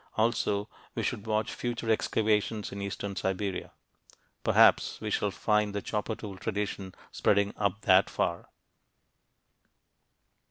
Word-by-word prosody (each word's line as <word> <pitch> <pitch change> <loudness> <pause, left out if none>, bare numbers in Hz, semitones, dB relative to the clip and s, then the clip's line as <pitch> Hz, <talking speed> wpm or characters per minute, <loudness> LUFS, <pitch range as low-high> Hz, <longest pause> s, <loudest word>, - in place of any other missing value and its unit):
Also 110 -2 +1 0.3
we - - -1
should 105 - -2
watch 110 0 0
future 120 -2 -2
excavations 110 -1 +1
in 100 - -5
eastern 100 0 -4
Siberia. 95 0 -2 0.7
Perhaps - - +5
we - - -4
shall 105 - +1
find 105 0 +1
the 100 - -1
chopper 110 +1 -2
tool 100 -3 -8
tradition 100 -3 -3 0.2
spreading 100 0 +2
up 100 +1 -1
that 95 -3 +5
far. 85 - -2
105 Hz, 120 wpm, -29 LUFS, 100-110 Hz, 0.7 s, Perhaps